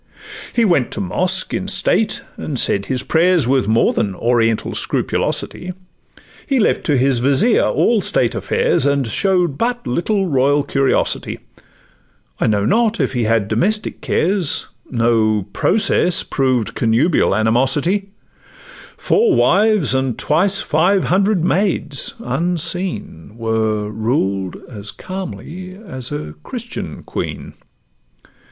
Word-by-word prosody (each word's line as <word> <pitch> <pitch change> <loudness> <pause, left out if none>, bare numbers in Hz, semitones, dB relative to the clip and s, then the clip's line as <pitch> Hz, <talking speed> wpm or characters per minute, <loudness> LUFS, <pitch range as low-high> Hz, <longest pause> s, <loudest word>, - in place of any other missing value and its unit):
He 235 - +2
went 170 - +2
to - - -5
mosque 185 - +1
in 190 - -3
state, 200 +1 +1
and 145 - -5
said 100 -4 +1
his 130 -1 -1
prayers 170 -3 +2
With 130 -3 +1
more 110 +1 +2
than 100 -3 -1
'Oriental 115 0 0
scrupulosity;' 180 +1 -1 0.7
He 275 -3 +1
left 215 - +1
to 145 -4 +2
his 130 -1 +2
vizier 140 - +3
all 230 -3 +2
state - - +1
affairs, 470 - +1
And 140 -2 +1
show'd 175 - +1
but 240 +1 -1
little 195 - 0
royal 145 -2 +2
curiosity: 135 -1 0 1.0
I - - +1
know 105 -2 +1
not 230 - +1
if - - 0
he 120 -3 -1
had 110 -2 +1
domestic 195 - -1
cares— 180 -2 0 0.2
No 115 -4 +1
process 185 -3 +2
proved 130 -5 -1
connubial 115 - +2
animosity; 135 - +1 0.9
Four 435 -4 +2
wives 205 -7 +3
and 130 -2 -1
twice 190 +6 +2
five 180 +5 +2
hundred 195 -1 +1
maids, 180 -8 0
unseen, 165 - -2
Were 110 -2 -1
ruled 100 -4 -1
as 105 -3 -7
calmly 185 -1 -8
as 135 - -8
a 110 - -5
Christian - - -7
queen. - - -6
145 Hz, 120 wpm, -18 LUFS, 115-190 Hz, 1.0 s, vizier